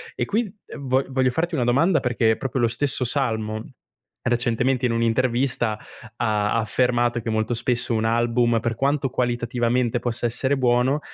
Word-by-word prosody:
E - - -1
qui, 215 -1 -1
ehm, 140 - -9
vo 130 +1 +2
voglio 130 -1 +1
farti 165 +7 -2
una 135 -6 +1
domanda, 155 +8 +3
perché 120 -3 +1
è - - +1
proprio 130 -1 -2
lo 120 - +4
stesso 125 +1 +1
Salmo, 110 -5 -1 0.6
recentemente 120 +2 0
in 120 - +1
un'intervista 115 -1 0 0.4
ha 105 -2 0
ha 115 - +2
affermato 120 +1 +1
che 115 - -4
molto 110 +1 0
spesso, 120 +1 -1
un 110 -1 0
album 120 +1 +2
per 115 0 -2
quanto 140 +2 0
qualitativamente 120 -1 0
possa 120 0 -3
essere 130 +4 0
buono, 125 +2 +2
120 Hz, 165 wpm, -23 LUFS, 115-130 Hz, 0.6 s, lo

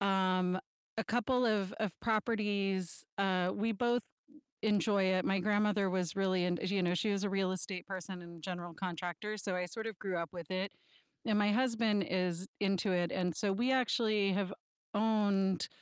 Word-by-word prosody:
um, 185 -2 +2 0.4
a 225 - -1
couple 245 +2 +1
of 200 -3 +1
of 210 -4 0
properties, 205 -5 0
uh, 185 -2 +2
we 225 +2 0
both 240 +2 +1 0.6
enjoy 205 -2 +3
it. 185 0 +2
My 195 - +2
grandmother 205 0 +2
was 180 -3 -1
really 185 -2 +2
int 175 -1 0
you 195 -2 +1
know, 175 0 +2
she 210 +4 +1
was 200 0 0
a 205 - 0
real 195 -1 +1
estate 185 0 -3
person 185 -1 -5
and 170 -1 -11
general 175 -1 -5
contractor, 180 +3 -4
so 195 -2 -2
I 180 0 -1
sort 220 +6 -5
of 220 -5 -5
grew 190 -3 -2
up 170 -2 -3
with 170 -4 -8
it, 190 +2 -2 0.5
and 215 -1 +3
my 205 0 +4
husband 225 -4 +2
is 180 -1 0
into 195 -1 +1
it, 175 -2 +1
and 180 -2 0
so 205 -2 +1
we 240 +6 +1
actually 215 -6 +2
have 195 0 -1 0.4
owned 205 -4 +2
195 Hz, 180 wpm, -34 LUFS, 185-210 Hz, 0.6 s, my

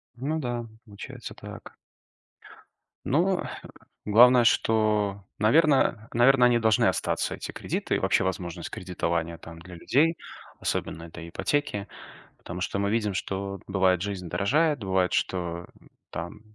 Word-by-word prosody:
Ну 145 +6 -2
да, 120 -4 -3 0.2
получается 100 -2 -9
так. - - -11 1.3
Ну 180 +7 +2
хэ - - -7 0.4
главное, 120 +4 +7
что, 105 -4 +2
наверно, 125 -2 +3
наверно, 125 +2 +5
они 120 -1 +4
должны 110 -2 +3
остаться, - - 0
эти - - -7
кредиты, - - -2
и - - 0
вообще - - +2
возможность 90 -2 -4
кредитования 85 -2 -3
там 80 0 -11
для 90 +1 -11
людей, 150 - +2 0.4
особенно 80 - -3
это 85 0 -9
ипотеки. 105 - -2 0.5
Потому 90 +1 -7
что 100 - -2
мы 100 0 0
видим, 105 -2 0
что 100 +1 -4
бывает, 95 -2 +2
жизнь 95 -3 -4
дорожает, 145 - +2
бывает, 95 -2 +1
что 85 -1 -2 0.4
там 85 +1 -6
100 Hz, 130 wpm, -26 LUFS, 90-120 Hz, 1.3 s, главное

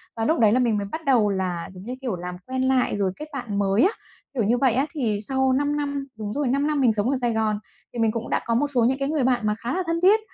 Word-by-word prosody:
Và 225 0 -1
lúc 320 +5 +2
đấy 215 -2 +5
là 250 - +3
mình 230 -4 +2
mới 200 -1 -3
bắt 320 -1 -5
đầu 235 -6 +4
là, 185 -3 -2
giống 185 0 -11
như 250 +3 -5
kiểu, 240 -8 -2
làm 180 0 -6
quen 260 0 -2
lại 260 -5 +2
rồi 195 -2 +1
kết 305 0 -8
bạn 220 -7 -3
mới 200 +3 +2
á, 390 - +4 0.4
kiểu 240 -5 0
như 235 +4 +2
vậy 255 -3 +3
á. 265 +4 +2
Thì 230 -9 0
sau 265 +3 +2
5 290 +2 +1
năm 280 -1 -3
đúng 210 -1 -4
rồi, 285 -2 -1
5 280 +4 +1
năm 300 -2 0
mình 235 -4 +4
sống 210 +4 0
ở 275 - +1
Sài 240 -2 +1
Gòn 215 -1 0 0.3
thì 235 - -5
mình 225 -1 +3
cũng 230 0 -5
đã - - 0
có 230 - 0
một 290 +4 +2
số 250 -5 +1
những 265 +2 +2
cái 275 +1 -1
người 300 -4 0
bạn 250 -2 +2
mà 210 - +1
khá 240 - -3
là 370 +1 0
thân 335 0 0
thiết. 410 +4 +6
245 Hz, 310 wpm, -24 LUFS, 215-275 Hz, 0.4 s, thiết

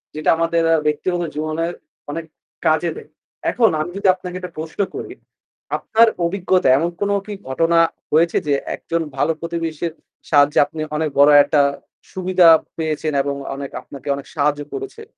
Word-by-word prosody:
যেটা 155 0 -1
আমাদের 165 0 +1 0.2
ব্যক্তিগত 175 +4 0
জীবনের 155 +2 -2 0.4
অনেক 165 +2 -5 0.4
কাজে 160 +2 +2
দেয়। - - -11 0.4
এখন 230 -3 +3
আমি 155 +3 -3
যদি 200 - 0
আপনাকে 180 -1 -8
একটা 180 - -9
প্রশ্ন 160 +4 -7 0.2
করি, - - -6 0.6
আপনার 230 +1 +4 0.2
অভিজ্ঞতা 185 +1 +1
এমন 165 +4 0
কোন 205 0 +1
কি 210 - -6 0.2
ঘটনা 165 +5 +2 0.3
হয়েছে? 165 +2 +3
যে 145 - +2 0.2
একজন 170 0 -3 0.2
ভালো 150 - +2
প্রতিবেশীর 165 -1 -3 0.4
সাহায্যে 145 0 +4
আপনি 155 +2 -8 0.2
অনেক 155 0 0
বড় 145 +1 +7
একটা 145 0 +2 0.5
সুবিধা 185 -1 +3 0.3
পেয়েছেন 155 -1 -2
এবং 140 0 -2 0.2
অনেক 140 0 -6
আপনাকে 140 -1 -12
অনেক 140 - -9
সাহায্য 145 0 +1
করেছে? 410 +3 -7
165 Hz, 150 wpm, -20 LUFS, 150-180 Hz, 0.6 s, বড়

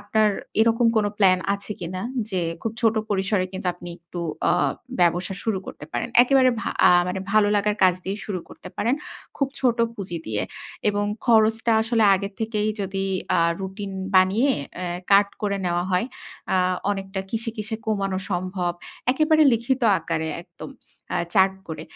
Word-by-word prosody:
আপনার 215 +1 +2 0.3
এরকম 230 +1 +3
কোন 210 -1 +3
প্ল্যান 185 -2 +5 0.2
আছে 200 +1 -6
কি 170 - -4
না 185 - -4 0.3
যে, 185 - 0 0.2
খুব 225 - -2
ছোট 225 -1 +4 0.2
পরিসরে 195 -1 +1
কিন্তু 190 0 -5
আপনি 175 - -10
একটু 170 +1 -8 0.3
অ - - +4 0.5
ব্যবসা 175 +2 +2
শুরু 220 -4 0
করতে - - -8
পারেন? - - -2
একেবারে 260 0 +4
ভা - - -3 0.2
আ - - +6 0.2
মানে 185 +1 -3
ভালো 215 -1 +5
লাগার 210 +1 +1
কাজ 185 -1 +5
দিয়েই 195 +3 -3
শুরু 190 -4 -3
করতে - - -11
পারেন। 235 +4 +1 0.4
খুব 275 - 0
ছোট 245 -3 +2 0.2
পুঁজি 185 -5 -5
দিয়ে 105 -1 -1 0.5
এবং 205 0 -1 0.2
খরচটা 225 0 +4
আসলে 225 0 +2
আগে 200 +1 -2
থেকেই 215 -1 0
যদি 195 0 -2 0.3
আ - - +2 0.2
রুটিন 195 +1 -5 0.2
বানিয়ে 195 +9 +4 0.3
অ্যা 175 -1 -3 0.2
কাট 200 0 +6
করে 200 -1 0
নেওয়া 175 0 0
হয়। 180 +6 +2 0.5
আ - - +4 0.3
অনেকটা 195 -1 -3
কিসে, 230 0 -1
কিসে 220 +1 -3
কমানো 195 -3 -1
সম্ভব। 180 0 -1 0.4
একেবারে 310 +2 +4
লিখিত 245 +3 0 0.2
আকারে 160 -1 -2
একদম - - -11 0.4
আ - - +1 0.2
চার্ট 190 -1 +4
করে। 155 -1 -5
200 Hz, 165 wpm, -24 LUFS, 185-225 Hz, 0.5 s, আ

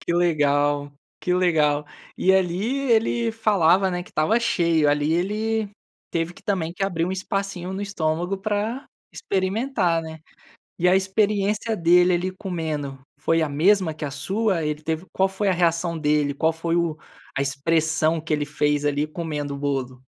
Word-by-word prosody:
Que 170 - -2
legal, 145 -4 +1 0.3
que 180 - -1
legal. 150 -5 +2 0.3
E 190 - +4
ali 190 +8 0
ele 230 +1 +2
falava, 195 -4 +3
né, 180 0 -3
que - - -16
estava 200 +10 +2
cheio, 165 -8 +2
ali 145 +2 +1
ele 210 +4 -1 0.4
teve 165 +1 -2
que - - -17
também 180 -5 -1
que 195 +2 -2
abrir 170 -4 -1
um 185 - -2
espacinho 190 -1 -3
no 190 - -4
estômago 175 -1 -1
para 215 +6 -2 0.3
experimentar, 190 -3 0
né. 160 0 -8 0.6
E 180 - +3
a 185 - +5
experiência 205 +2 +1
dele 175 0 +4
ali 180 +2 0
comendo 160 -8 -4 0.2
foi 165 +2 +1
a 155 - +1
mesma 170 +3 +3
que 155 - -8
a 145 - -3
sua? 190 +3 -1
Ele 150 0 -2
teve, 160 +3 -3
qual 190 0 +2
foi 195 +2 -2
a 190 - +3
reação 170 -1 +1
dele? 150 -2 +1
Qual 160 +3 +1
foi 165 +1 -2
o 170 -2 0 0.4
a 135 - 0
expressão 160 +3 +1
que 160 - -7
ele 150 -1 0
fez 150 0 0
ali 145 +1 0
comendo 150 -3 -4
o - - -7
bolo? 130 -3 -3
170 Hz, 170 wpm, -23 LUFS, 150-195 Hz, 0.6 s, a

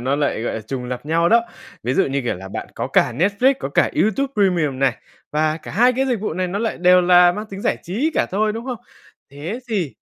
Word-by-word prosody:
nó 135 +4 0
lại, 145 -6 -1
gọi - - -2
là, 110 - -4
trùng 125 +3 -5
lặp 125 +3 -6
nhau 165 +2 +2
đó. 235 +1 +5 0.4
Ví 125 +3 -1
dụ - - +3
như 140 +1 -1
kiểu 120 - -1
là 95 +1 -9
bạn - - -6
có - - -3
cả 125 - +2
Netflix, 200 - +2
có - - -3
cả - - +2
YouTube 270 +6 0
Premium 170 -9 +1
này, 135 -1 +1 0.4
và 155 +1 +1
cả 160 - -10
hai 245 +5 +4
cái 265 +2 0
dịch 245 -5 -1
vụ 210 - -2
này 185 0 -1
nó 195 - -3
lại 225 +1 -2
đều 180 +1 +5
là 175 0 +6
mang 210 +4 -6
tính 195 0 -7
giải - - 0
trí 230 - -1
cả - - +1
thôi, 215 +3 +1
đúng 225 +2 -6
không? 245 -4 -4 0.5
Thế 155 - -6
thì 185 - -2
180 Hz, 255 wpm, -20 LUFS, 140-215 Hz, 0.5 s, là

